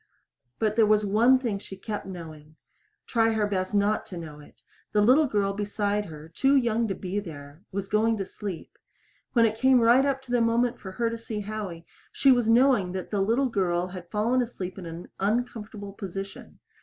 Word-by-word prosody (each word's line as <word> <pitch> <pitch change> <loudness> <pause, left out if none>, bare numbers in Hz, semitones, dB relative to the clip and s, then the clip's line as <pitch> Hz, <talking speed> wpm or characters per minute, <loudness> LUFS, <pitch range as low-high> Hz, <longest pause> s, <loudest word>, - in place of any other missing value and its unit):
But 215 -1 0
there 220 -2 +5
was 210 0 +3
one 230 +6 +5
thing 230 -6 -2
she 195 -1 -10
kept 210 +1 -5
knowing 155 -4 -10 0.5
try 225 -1 +2
her 215 -1 +1
best 190 0 -2
not 205 +1 +2
to 180 - -8
know 155 -3 -8
it! 145 - -18 0.3
The 210 - +4
little 265 +8 +5
girl 200 -4 0
beside 205 0 -1
her, 155 -2 -10
too 270 +12 +2
young 235 -3 +2
to 195 - -2
be 190 +2 -3
there, 145 -4 -10
was 200 0 -3
going 220 +2 +2
to 195 - -3
sleep. 195 -4 -8 0.5
When 230 -2 +5
it 220 0 -1
came 260 0 +5
right 240 +3 +5
up 275 -1 -1
to 255 - -11
the 245 -1 +3
moment 235 +1 +1
for 190 -2 -8
her 230 +3 0
to 230 - -5
see 220 -2 -5
Howie, 200 -5 -6 0.3
she 275 - +4
was 245 -3 +3
knowing 235 -6 +4
that 190 -1 -5
that 205 -2 0
little 235 +7 +2
girl 180 -5 0
had 180 -2 -9
fallen 230 +4 +1
asleep 195 -6 -5
in 175 - -7
an 165 +2 -8
uncomfortable 210 -1 -2
position. 195 -1 -7
210 Hz, 200 wpm, -26 LUFS, 190-230 Hz, 0.5 s, there